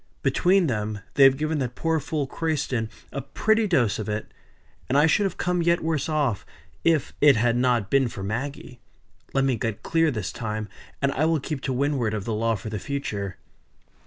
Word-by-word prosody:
Between 185 Hz, +1 st, +3 dB
them 105 Hz, -5 st, -2 dB
they 140 Hz, -, +7 dB
have 135 Hz, 0 st, +6 dB
given 155 Hz, +1 st, -1 dB
that 125 Hz, -2 st, -3 dB
poor 165 Hz, -1 st, 0 dB
fool 150 Hz, 0 st, -2 dB
Crayston 135 Hz, -8 st, -1 dB, 0.2 s
a 140 Hz, -, -4 dB
pretty 220 Hz, -, +1 dB
dose 125 Hz, -, +2 dB
of 110 Hz, -, -4 dB
it; 105 Hz, 0 st, -4 dB, 0.6 s
and 135 Hz, -, +3 dB
I 145 Hz, -, +6 dB
should 180 Hz, +6 st, +3 dB
have 195 Hz, -, -2 dB
come 180 Hz, 0 st, 0 dB
yet 170 Hz, +1 st, +2 dB
worse 160 Hz, -2 st, -1 dB
off 145 Hz, -, 0 dB, 0.4 s
if 160 Hz, -5 st, +2 dB
it 145 Hz, -2 st, +7 dB
had 115 Hz, +1 st, +2 dB
not 120 Hz, -5 st, +1 dB
been 135 Hz, -2 st, +4 dB
for 100 Hz, -4 st, -7 dB
Maggie. 125 Hz, +3 st, -5 dB, 0.6 s
Let 135 Hz, -, +3 dB
me 135 Hz, -3 st, +1 dB
get 110 Hz, -1 st, -3 dB
clear 165 Hz, -1 st, +2 dB
this 105 Hz, -, -3 dB
time, 110 Hz, +1 st, -4 dB, 0.4 s
and 140 Hz, -, +3 dB
I 145 Hz, +3 st, +1 dB
will 160 Hz, -1 st, +2 dB
keep 140 Hz, 0 st, -4 dB
to 135 Hz, -, -2 dB
windward 130 Hz, -4 st, 0 dB
of 105 Hz, -2 st, -4 dB
the 115 Hz, -, -2 dB
law 115 Hz, +1 st, +1 dB
for 105 Hz, +2 st, -6 dB
the 105 Hz, -, -3 dB
future." 100 Hz, -, -4 dB
135 Hz, 200 wpm, -25 LUFS, 110-155 Hz, 0.6 s, they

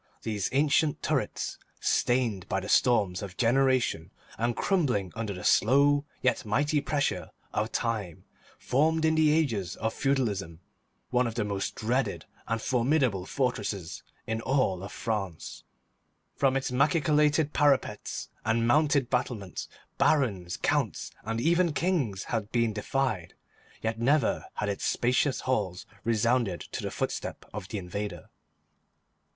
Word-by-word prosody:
These 105 Hz, -3 st, -1 dB
ancient 150 Hz, +2 st, +2 dB
turrets, -, -, -1 dB, 0.2 s
stained 120 Hz, -7 st, +1 dB
by 95 Hz, -, +1 dB
the 95 Hz, -, -7 dB
storms 100 Hz, -7 st, +3 dB
of 95 Hz, -3 st, -7 dB
generations 125 Hz, -8 st, +2 dB, 0.3 s
and 120 Hz, +1 st, 0 dB
crumbling 125 Hz, -, 0 dB
under 115 Hz, -2 st, -3 dB
the 90 Hz, -2 st, -6 dB
slow 140 Hz, +6 st, +4 dB, 0.2 s
yet 125 Hz, -2 st, +2 dB
mighty 145 Hz, +7 st, +1 dB
pressure 145 Hz, -1 st, -1 dB, 0.2 s
of 110 Hz, +2 st, -1 dB
time, 105 Hz, -8 st, -2 dB, 0.3 s
formed 160 Hz, +4 st, +2 dB
in 160 Hz, -, +4 dB
the 160 Hz, -1 st, +4 dB
ages 115 Hz, -, 0 dB
of 110 Hz, 0 st, -2 dB
feudalism 105 Hz, -12 st, -1 dB, 0.5 s
one 125 Hz, 0 st, +3 dB
of 115 Hz, -, -5 dB
the 115 Hz, -, 0 dB
most 100 Hz, -1 st, -3 dB
dreaded 125 Hz, +4 st, -1 dB, 0.2 s
and 115 Hz, 0 st, 0 dB
formidable 125 Hz, -6 st, +1 dB
fortresses 105 Hz, -, -2 dB, 0.2 s
in 110 Hz, 0 st, -2 dB
all 100 Hz, -8 st, 0 dB
France. 100 Hz, -7 st, -4 dB, 0.7 s
From 135 Hz, -1 st, +2 dB
its 135 Hz, -, -2 dB
machicolated 150 Hz, +2 st, +3 dB
parapets 145 Hz, -3 st, +1 dB
and 115 Hz, +1 st, +1 dB
mounted 145 Hz, 0 st, +3 dB
battlements 120 Hz, -7 st, -2 dB, 0.3 s
Barons, 100 Hz, -, +2 dB
Counts, -, -, 0 dB
and 115 Hz, +2 st, -2 dB
even 170 Hz, +4 st, +3 dB
Kings 145 Hz, -, 0 dB
had 110 Hz, -3 st, -3 dB
been 115 Hz, -2 st, +1 dB
defied, 110 Hz, -4 st, -2 dB, 0.5 s
yet 110 Hz, 0 st, -1 dB
never 135 Hz, +1 st, +2 dB
had 105 Hz, -, -2 dB
its 100 Hz, -1 st, -3 dB
spacious 125 Hz, +3 st, +1 dB
halls 100 Hz, -8 st, -1 dB, 0.2 s
resounded 115 Hz, -4 st, +1 dB
to -, -, -4 dB
the -, -, -3 dB
footstep -, -, -4 dB
of 105 Hz, -3 st, -6 dB
the 105 Hz, -, -4 dB
invader. 95 Hz, -1 st, -5 dB
120 Hz, 130 wpm, -28 LUFS, 100-140 Hz, 0.7 s, slow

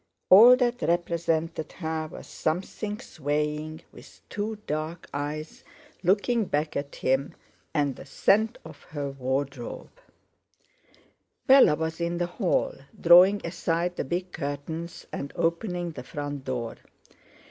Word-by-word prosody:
All 230 Hz, +7 st, +10 dB
that 245 Hz, -1 st, 0 dB
represented 165 Hz, -2 st, -1 dB
her 160 Hz, -2 st, -3 dB
was -, -, -9 dB
something 200 Hz, +6 st, -3 dB
swaying 150 Hz, -, -3 dB
with -, -, -15 dB
two 215 Hz, +1 st, -3 dB
dark 155 Hz, +3 st, -4 dB
eyes 150 Hz, +2 st, -5 dB, 0.4 s
looking 205 Hz, +5 st, +2 dB
back 150 Hz, -2 st, -1 dB
at 140 Hz, 0 st, -4 dB
him; 135 Hz, +2 st, 0 dB, 0.4 s
and 145 Hz, -4 st, 0 dB
the -, -, -11 dB
scent 220 Hz, -, +2 dB
of 155 Hz, -3 st, -11 dB
her 145 Hz, -2 st, -4 dB
wardrobe. 135 Hz, -1 st, -4 dB, 1.5 s
Bella 265 Hz, -, +7 dB
was 160 Hz, +2 st, -3 dB
in 170 Hz, 0 st, -1 dB
the 175 Hz, -, 0 dB
hall, 175 Hz, +2 st, 0 dB, 0.3 s
drawing 180 Hz, +4 st, +7 dB
aside 170 Hz, +1 st, -1 dB
the -, -, -2 dB
big 180 Hz, +6 st, -3 dB
curtains, 160 Hz, +4 st, -5 dB
and 140 Hz, -, -4 dB
opening 175 Hz, +1 st, -1 dB
the 140 Hz, -, -8 dB
front 145 Hz, +1 st, -6 dB
door. 120 Hz, -3 st, -3 dB
160 Hz, 125 wpm, -27 LUFS, 145-180 Hz, 1.5 s, All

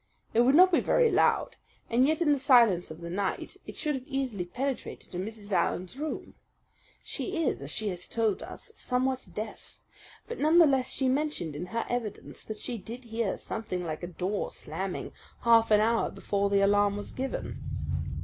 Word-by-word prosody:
It 230 Hz, -, +5 dB
would 260 Hz, +4 st, +5 dB
not 365 Hz, +3 st, +8 dB
be 335 Hz, -, +5 dB
very -, -, +3 dB
loud, -, -, +2 dB, 0.3 s
and 245 Hz, +3 st, +3 dB
yet 315 Hz, +3 st, +2 dB
in 300 Hz, -, +3 dB
the 285 Hz, -, +3 dB
silence 235 Hz, -10 st, +5 dB
of 160 Hz, +2 st, -9 dB
the 170 Hz, -, -6 dB
night 195 Hz, +1 st, -2 dB
it -, -, -7 dB
should 300 Hz, -2 st, -1 dB
have 265 Hz, 0 st, -5 dB
easily 260 Hz, -, -2 dB
penetrated 260 Hz, +9 st, -4 dB
to 180 Hz, -, -4 dB
Mrs. 210 Hz, +1 st, -6 dB
Allen's 185 Hz, +1 st, 0 dB
room. 300 Hz, +3 st, -5 dB, 0.7 s
She 355 Hz, -4 st, -2 dB
is, -, -, 0 dB
as 140 Hz, -, -6 dB
she 215 Hz, +6 st, -1 dB
has 180 Hz, -1 st, -5 dB
told 220 Hz, -3 st, 0 dB
us, -, -, -9 dB
somewhat 255 Hz, -1 st, -1 dB
deaf; 215 Hz, 0 st, -7 dB, 0.5 s
but 475 Hz, -, -6 dB
none 310 Hz, +3 st, +4 dB
the 340 Hz, -, +9 dB
less 265 Hz, -3 st, +2 dB
she 265 Hz, -, 0 dB
mentioned 260 Hz, -, -1 dB
in 175 Hz, +5 st, -5 dB
her 230 Hz, +5 st, -2 dB
evidence 240 Hz, -4 st, -4 dB
that 215 Hz, -, -5 dB
she 240 Hz, 0 st, -4 dB
did 230 Hz, +7 st, -8 dB
hear 225 Hz, -3 st, -2 dB
something 185 Hz, -5 st, -4 dB
like 155 Hz, -2 st, -4 dB
a 175 Hz, -, -4 dB
door 185 Hz, +3 st, -2 dB
slamming 185 Hz, +4 st, -5 dB, 0.3 s
half 230 Hz, -1 st, +5 dB
an 210 Hz, -1 st, +6 dB
hour 230 Hz, +1 st, +2 dB
before 200 Hz, 0 st, -1 dB
the 200 Hz, 0 st, +3 dB
alarm 205 Hz, 0 st, +3 dB
was 205 Hz, -, -6 dB
given. 265 Hz, +1 st, -4 dB
225 Hz, 190 wpm, -29 LUFS, 195-265 Hz, 0.7 s, the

